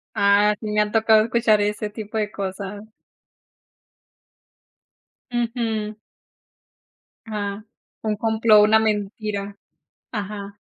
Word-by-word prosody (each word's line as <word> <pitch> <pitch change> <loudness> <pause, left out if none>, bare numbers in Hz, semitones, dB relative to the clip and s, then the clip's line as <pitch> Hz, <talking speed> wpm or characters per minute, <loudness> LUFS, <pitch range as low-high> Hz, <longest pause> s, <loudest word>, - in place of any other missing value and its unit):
Ah, 200 +1 +4
sí, 215 -2 -5
me 210 0 +3
ha 210 0 -1
tocado 220 -1 +5
escuchar 225 -2 +2
ese 210 +1 -1
tipo 215 +1 -6
de 210 -1 -1
cosas. 200 +1 -5 2.5
Ujú. 225 -3 -2 1.3
Ah, 205 -1 -4 0.4
un 215 -1 0
complot, 220 0 +4
una 220 +1 +5
mentira. 205 -1 -2 0.5
Ajá. 205 -2 -6
210 Hz, 95 wpm, -22 LUFS, 205-220 Hz, 2.5 s, tocado